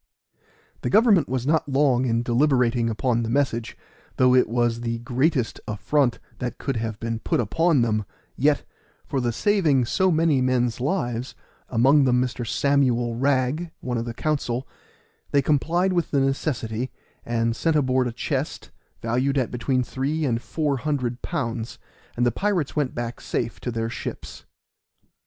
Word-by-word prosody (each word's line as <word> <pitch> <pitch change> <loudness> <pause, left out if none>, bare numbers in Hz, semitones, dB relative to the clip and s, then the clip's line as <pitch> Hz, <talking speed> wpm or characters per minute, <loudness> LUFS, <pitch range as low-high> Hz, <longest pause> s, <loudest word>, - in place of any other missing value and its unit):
The - - -1
government 210 - +4
was 130 -1 -1
not 155 0 +1
long 135 -2 +3
in 115 0 +1
deliberating 120 -2 +2
upon 120 +1 0
the 115 - -2
message, 120 -3 -1 0.4
though 125 0 +5
it 125 -3 +4
was 120 0 0
the 115 -1 -2
greatest 125 +2 0
affront 120 +5 +1 0.2
that 125 -1 -4
could 135 -4 -2
have 110 -2 -3
been 115 -1 -3
put - - 0
upon 150 - +2
them, 110 -2 0 0.3
yet, - - +2 0.4
for 135 - -2
the 120 -1 0
saving 155 - +2
so 190 +10 +2
many 160 -5 +3
men's 125 -2 +1
lives 125 -5 -2 0.3
(among 135 +4 +4
them 125 -1 +3
Mr. 125 -1 -2
Samuel 125 -5 +1
Wragg, 135 +5 +1
one 125 -2 -2
of 115 - -3
the 115 -1 -5
council), 135 -4 -1 0.6
they 140 - +3
complied 170 +7 +1
with 175 -3 0
the 140 - +1
necessity 130 -3 -1 0.3
and 115 -1 0
sent 165 +5 +1
aboard 130 -3 +2
a - - -3
chest, 135 +4 -3 0.3
valued 125 +4 +1
at 130 -3 0
between 125 +1 0
three 145 +5 -2
and 120 -3 0
four 150 -1 -1
hundred 125 -4 -2
pounds, 115 -8 -3 0.4
and 120 - +2
the 120 - +3
pirates 190 - -1
went 145 -4 -1
back 120 0 -4
safe 115 -1 -3
to - - -4
their 115 -1 -2
ships. 115 - -7
125 Hz, 160 wpm, -24 LUFS, 120-145 Hz, 0.6 s, though